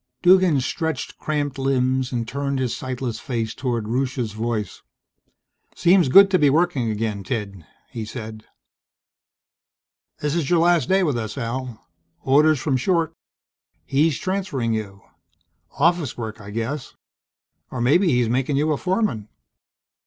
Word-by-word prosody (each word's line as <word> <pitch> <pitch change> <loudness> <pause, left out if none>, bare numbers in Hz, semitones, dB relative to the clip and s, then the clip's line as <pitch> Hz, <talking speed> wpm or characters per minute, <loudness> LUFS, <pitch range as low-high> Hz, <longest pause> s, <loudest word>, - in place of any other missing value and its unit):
Duggan 180 -6 +5
stretched 160 +2 -3
cramped 145 -3 -2
limbs 130 -1 +1
and 120 -3 -2
turned 140 +2 -2
his 130 -3 -1
sightless 125 -3 -4
face 115 -4 -3
toward 120 -4 -2
Rusche's 125 -1 -1
voice. 110 0 -3 0.9
"Seems 175 -4 +4
good 195 +7 +8
to 185 - +3
be 145 - +5
working 150 -6 +1
again, 105 -2 -2
Ted," 100 - -5 0.2
he 115 - -5
said. 110 -1 -8 1.8
"This's 150 0 -1
your 175 - +4
last 170 -5 +3
day 190 0 +3
with 145 -8 0
us, 110 -2 -5
Al. 120 -1 -5 0.4
Orders 150 +2 +4
from 130 +1 0
Short. 165 +3 0 0.7
He's 145 +1 +2
transferring 180 - -2
you. 100 -3 -5 0.8
Office 165 -2 +1
work 110 -2 -6
I 100 - -10
guess, 115 +6 -4 0.7
or 130 - -6
maybe 145 +11 +3
he's 125 -6 +2
making 130 +4 0
you 155 +2 +1
a 150 - +1
foreman." 185 - -1
130 Hz, 135 wpm, -22 LUFS, 115-155 Hz, 1.8 s, good